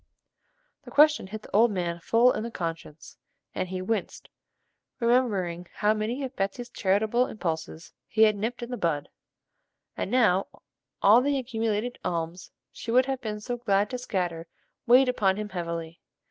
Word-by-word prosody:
The - - -11
question 300 -6 +4
hit 215 +2 -8
the - - -7
old 230 +3 +6
man 175 -4 -2
full 230 +8 +4
in - - -2
the 230 - -4
conscience, 165 -6 -6 0.4
and 185 - -3
he 185 0 -4
winced, 210 0 -3 0.7
remembering 205 -8 +1
how 210 0 +2
many 220 +6 -2
of 265 0 -5
Betsey's 200 +5 -3
charitable 215 +5 +1
impulses 160 -4 -5
he 220 - +3
had 215 -1 +5
nipped 230 +4 -3
in 240 - -7
the 245 - -3
bud, 155 -7 -1 0.9
and - - -3
now 210 -6 +3 0.6
all 215 +5 +7
the 280 +1 +1
accumulated 230 -2 -2
alms 170 +1 -3 0.2
she - - -9
would 250 +2 +4
have 265 -1 -3
been 215 -2 -4
so 245 +3 -4
glad 205 -3 +1
to 250 - -3
scatter 175 -8 -3 0.4
weighed 255 +3 +6
upon 200 -6 +2
him 210 0 -4
heavily. 170 -3 -5
215 Hz, 160 wpm, -27 LUFS, 180-245 Hz, 0.9 s, all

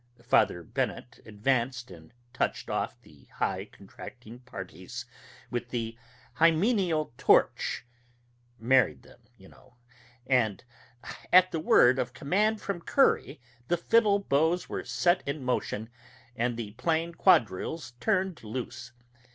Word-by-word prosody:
Father 90 -7 +2
Bennett 120 +8 -4
advanced 120 +2 -1
and 80 -3 -13 0.2
touched - - -2
off - - -2
the - - -19
high - - -1
contracting 115 +3 -12
parties 100 -1 -8 0.5
with 120 -1 -3
the 115 -2 -3 0.4
hymeneal 165 - +2
torch - - +2 0.7
(married 125 +3 +2
them, - - -18 0.2
you 95 - -16
know), 130 +2 -21 0.5
and 120 -6 +1 0.7
at 185 0 +7
the 165 - -2
word 130 -4 +5
of 125 0 -3
command 210 +11 +1
from 195 -4 -4
Curry, 275 - +2 0.3
the 175 - +1
fiddle 210 +3 +3
bows 165 -1 +1
were - - -4
set 175 +1 +1
in 140 0 -3
motion, 120 -3 -2 0.5
and 120 0 -1
the 110 -3 -5
plain 165 +8 -1
quadrilles 160 - +2
turned 190 - 0
loose. 120 +1 -6
130 Hz, 120 wpm, -28 LUFS, 115-170 Hz, 0.7 s, at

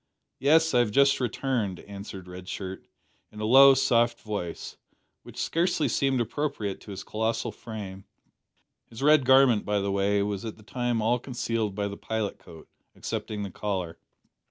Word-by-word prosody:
"Yes; 160 +3 +4
I 125 - +5
have 120 -3 +2
just 140 +5 +4
returned," 120 -6 -1
answered 100 -2 -9
Red 90 0 -9
Shirt, 95 -1 -6 0.4
in 105 - -11
a 110 - -2
low 135 +4 +8
soft 120 -3 +2
voice, 100 -6 -5 0.5
which - - -14
scarcely 165 -2 +1
seemed 135 -2 +1
appropriate 120 -4 -3
to - - -13
his 100 - -6
colossal 110 +1 -2
frame. 100 -4 -8 0.8
His 115 +3 -8
red 150 -2 +5
garment, 130 -4 +5
by 105 0 0
the 100 0 -1
way, 100 +1 +1
was 100 -1 -3
at 110 -2 -6
the 110 - -17
time 120 0 -1
all 120 +3 +2
concealed 115 -5 -3
by 100 0 -1
the 100 0 -7
pilot 110 -2 -3
coat, 80 -3 -14 0.3
excepting 105 -1 -4
the 100 - -6
collar. 90 -4 -4
110 Hz, 165 wpm, -27 LUFS, 100-130 Hz, 0.8 s, low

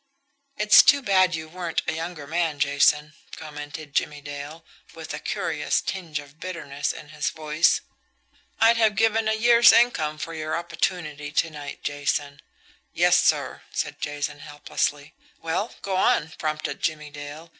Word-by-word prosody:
"It's 210 0 +8
too 285 -1 +4
bad 185 -5 +3
you 160 0 -6
weren't 175 0 -3
a - - 0
younger 165 -2 -5
man, 160 0 -1
Jason," 145 +1 +2 0.2
commented 150 -1 -8
Jimmie 145 0 -1
Dale, 145 +3 -8 0.3
with - - -7
a - - -4
curious - - -1
tinge 170 -6 -4
of 145 +1 -10
bitterness 165 -6 -3
in 150 - -11
his 150 -1 -2
voice. 155 +1 +2 0.8
"I'd 230 +1 +5
have 220 -2 +3
given 225 +1 +2
a 220 - +2
year's 235 +1 +7
income 160 -11 +2
for 165 +2 -6
your 155 0 -3
opportunity 170 -3 -3
to 165 0 +1
night, 145 -2 -8
Jason." 145 0 -2 0.5
"Yes, - - +4
sir," - - +1
said - - -4
Jason 145 0 -3
helplessly. 145 0 -3 0.3
"Well, 175 +7 -3
go 195 -1 -2
on," 160 -4 +2
prompted 155 -1 -3
Jimmie 150 -2 -2
Dale. 145 +3 -9
155 Hz, 150 wpm, -24 LUFS, 145-180 Hz, 0.8 s, It's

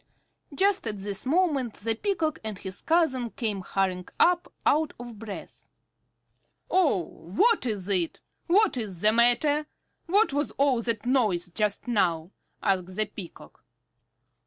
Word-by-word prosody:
Just 395 +4 +2
at 210 - -2
this 200 +4 -4
moment 285 - +1
the 225 +2 -1
Peacock 320 - -1
and 215 -2 -4
his 190 0 -7
cousin 310 -8 +1
came 215 -4 -3
hurrying 185 -1 -1
up 355 0 +3
out 310 +1 +2
of 240 -3 -9
breath. 215 -3 -9 1.0
"Oh, 305 - +3
what 255 - +1
is 200 -5 -3
it? 185 -5 0 0.3
What 385 -3 +3
is 200 -7 -5
the 215 - +5
matter? 285 +6 +3 0.4
What 400 -1 +3
was 290 +1 0
all 270 -4 +3
that 230 -2 -1
noise 215 -10 +1
just 210 +5 -1
now?" 175 -7 +1 0.3
asked 185 -2 0
the 215 +1 +2
Peacock. 195 -4 -11
230 Hz, 135 wpm, -27 LUFS, 195-300 Hz, 1.0 s, the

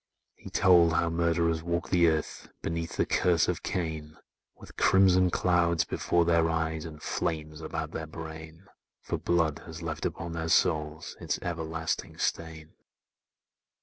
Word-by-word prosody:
He - - -12
told 85 -3 +5
how 85 0 +1
murderers 85 -1 +1
walk 85 0 -2
the 85 -2 +5
earth 80 -2 -2
Beneath 85 0 -3
the - - +2
curse 85 -3 +2
of - - -1
Cain,— 80 -3 -4 0.4
With - - -14
crimson 95 -1 +4
clouds 85 -2 +2
before 85 -1 +1
their 85 -1 +3
eyes, 80 -1 -1
And 80 -2 -9
flames 80 -1 -3
about 80 0 -4
their 80 0 -5
brain: 80 +2 -9 0.4
For - - -3
blood 85 -3 +1
has 80 0 -8
left 80 -2 -4
upon 85 0 -6
their 80 -1 -3
souls 75 0 +1
Its - - -2
everlasting 80 -1 -3
stain! 80 -1 -3
80 Hz, 145 wpm, -28 LUFS, 80-85 Hz, 0.4 s, told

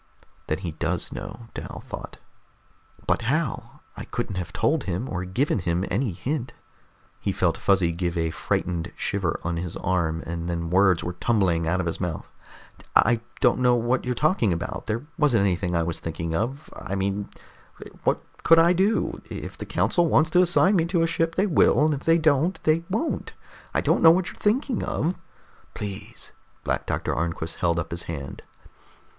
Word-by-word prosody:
Then - - 0
he 90 -3 -5
does 80 - -2
know! - - -7
Dal - - -7
thought. - - -8 0.9
But - - +1
how? 135 -3 -2
I - - -7
couldn't 110 -6 -4
have 90 -2 -4
told 150 - +1
him, 95 +7 -2
or 90 -4 -3
given 115 +6 0
him 85 +1 0
any 115 +2 0
hint. 125 - -3 0.7
He - - -1
felt - - +1
Fuzzy 95 -4 +2
give 85 0 -2
a 80 -1 0
frightened 85 +2 -2
shiver 95 -5 -1
on 85 0 -2
his 85 0 -4
arm, 85 -4 0
and 85 +1 -4
then 85 -1 -3
words 95 -2 +4
were 90 - -3
tumbling 90 -5 +1
out 90 +3 +1
of 95 - -1
his 85 - -3
mouth. 90 -4 -3 0.7
"I 120 +1 +5 0.2
don't 125 0 +4
know 125 -1 +4
what 120 +2 +1
you're 125 0 -1
talking 150 - +2
about, 85 -1 -4
there 115 +5 -2
wasn't 130 -8 +4
anything 90 -2 0
I 85 - +2
was 85 0 -2
thinking 80 0 -4
of. 125 - -2
I 100 - -5
mean, 100 +1 -2 0.7
what - - +1 0.2
could 165 - +6
I 170 +2 +6
do? 195 +5 +1
If - - -6
the - - -8
council 175 -2 +2
wants 160 0 +3
to 180 - +5
assign 185 +3 +4
me 165 - +2
to 170 -1 +1
a - - +2
ship, 165 0 0
they 190 - +3
will, 155 -5 +4
and 155 - +2
if 140 - -5
they 165 0 +5
don't, 155 +2 +2
they 155 +2 +3
won't. 225 - -2 0.4
I - - +1
don't - - +2
know 165 - +9
what 175 +2 +3
you're - - -13
thinking 245 +4 +1
of." 170 +4 0 0.6
"Please." 100 -2 -6 0.3
Black - - -2
Doctor - - -1
Arnquist 80 -1 -2
held 85 -1 +1
up 85 - -3
his 85 0 -4
hand. 70 -4 -6
100 Hz, 185 wpm, -25 LUFS, -, 0.9 s, know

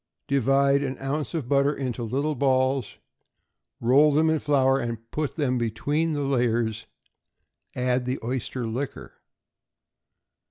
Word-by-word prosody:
Divide 140 +1 +3
an 135 -2 -3
ounce 145 +4 -3
of 150 -7 -3
butter 140 +1 +3
into 125 -3 -4
little 135 +7 -1
balls, 130 -1 +1 0.8
roll 140 +6 +5
them 160 +2 +3
in 160 - +1
flour, 135 -2 +2
and 120 -2 -3
put 150 -2 -2
them 130 -5 0
between 145 +8 -1
the 145 -1 -1
layers; 120 -4 0 0.9
add 125 0 0
the 125 +1 -1
oyster 125 0 -3
liquor. 125 +5 -5
135 Hz, 125 wpm, -25 LUFS, 125-145 Hz, 0.9 s, roll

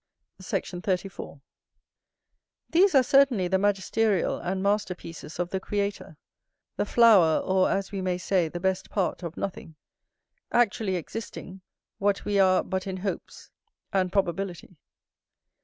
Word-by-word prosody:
Sect. - - -3
34. 185 -6 -4 1.3
These 365 0 +4
are 265 - +7
certainly 255 -8 +4
the 190 +1 +1
magisterial 205 0 +1
and 190 +1 -3
masterpieces 185 -6 -3
of 175 0 -2
the 190 - -1
Creator; 200 -5 -3 0.6
the - - -1
flower, 205 -9 +5
or, 190 0 +2
as 195 0 -1
we 195 -2 -3
may 185 -1 -1
say, 180 -1 +1
the 175 - -6
best 190 +1 -1
part 190 -3 -1
of 170 -1 -7
nothing; 175 -4 -5 0.8
actually 220 -4 +1
existing, 190 +1 -7 0.4
what 200 0 0
we 205 -1 +1
are 185 -1 +4
but 190 +1 -3
in 190 -1 -3
hopes, 195 +1 -6 0.4
and 185 -2 +1
probability. 185 -2 -2
190 Hz, 130 wpm, -26 LUFS, 180-205 Hz, 1.3 s, are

